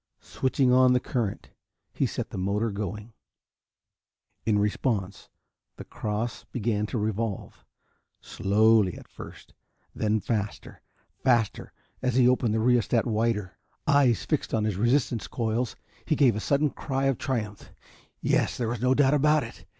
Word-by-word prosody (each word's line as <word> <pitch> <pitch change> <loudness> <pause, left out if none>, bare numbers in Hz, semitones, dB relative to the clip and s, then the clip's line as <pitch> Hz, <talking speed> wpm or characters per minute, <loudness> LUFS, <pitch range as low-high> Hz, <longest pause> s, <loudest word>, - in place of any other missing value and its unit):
Switching 130 -1 +1
on 130 0 +5
the 125 - +3
current, 120 -6 -3 0.4
he - - 0
set - - -5
the - - -6
motor 105 +4 0
going. 105 +2 -5 1.3
In 105 -2 +3
response, 105 -1 -1 0.5
the - - -9
cross 110 +2 -4
began 110 -3 -1
to 120 - -3
revolve, 110 -1 -3 0.6
slowly 105 -1 +2
at - - -13
first - - -12 0.4
then 110 0 0
faster, 105 -1 -4 0.4
faster, 120 -5 +1 0.3
as 125 -2 0
he 125 -1 +5
opened 125 -3 +2
the - - +1
rheostat 120 -1 +2
wider. 110 -4 -1 0.3
Eyes 135 -6 +3
fixed 155 -6 -1
on 110 - 0
his 105 -3 -1
resistance 120 0 +1
coils, 115 0 -2 0.3
he 155 - 0
gave 130 -7 +4
a - - -2
sudden 140 +5 +1
cry 135 -2 -3
of 135 -3 +1
triumph. 110 -6 -4 0.5
Yes, - - +1
there 120 -3 -1
was 120 -1 -3
no 125 +1 +3
doubt 140 0 +4
about 150 +1 +3
it! 115 - -11
115 Hz, 145 wpm, -27 LUFS, 105-130 Hz, 1.3 s, on